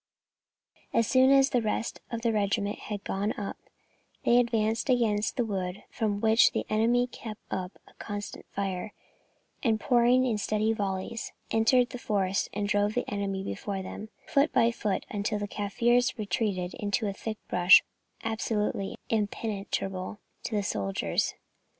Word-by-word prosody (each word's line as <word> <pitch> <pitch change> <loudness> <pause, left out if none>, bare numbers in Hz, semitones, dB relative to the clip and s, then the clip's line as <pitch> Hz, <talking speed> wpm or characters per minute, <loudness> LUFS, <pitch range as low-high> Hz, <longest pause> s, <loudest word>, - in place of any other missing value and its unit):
As 230 - +4
soon 260 +3 +5
as 275 0 +5
the 245 - +2
rest 220 +1 -2
of 230 -1 -4
the 230 -1 +2
regiment 205 0 0
had 205 -1 -5
got 200 +2 -2
up, 200 -2 -4 0.7
they 240 +1 +6
advanced 225 0 +1
against 220 -4 +2
the 245 - +2
wood, 190 -2 -3
from 210 -2 -1
which 220 +2 +5
the - - -1
enemy 235 +3 +3
kept 225 -3 -8
up 185 0 -4
a - - -19
constant 205 -1 -6
fire, 195 0 -3 0.7
and 225 -4 +2
pouring 245 +2 +4
in 225 -4 0
steady 215 +2 +1
volleys, 200 +2 -3 0.2
entered 245 +3 +4
the 250 - -6
forest 195 -4 0
and 205 0 -2
drove 205 +1 +1
the 245 - -1
enemy 195 -1 -2
before 190 - -4
them 210 +3 -7 0.2
foot 280 +2 +2
by 230 +1 +4
foot, 210 -4 -2
until 210 +1 -1
the 205 0 -3
Kaffirs 235 +5 +1
retreated 200 -4 -1
into 205 +2 0
a 200 - -2
thick 215 +2 -5
bush 180 +2 +7 0.4
absolutely 215 -3 -1 0.2
impenetrable 205 -3 -2 0.3
to 220 - -2
the 205 - +1
soldiers. 100 - -1
215 Hz, 150 wpm, -28 LUFS, 200-230 Hz, 0.7 s, bush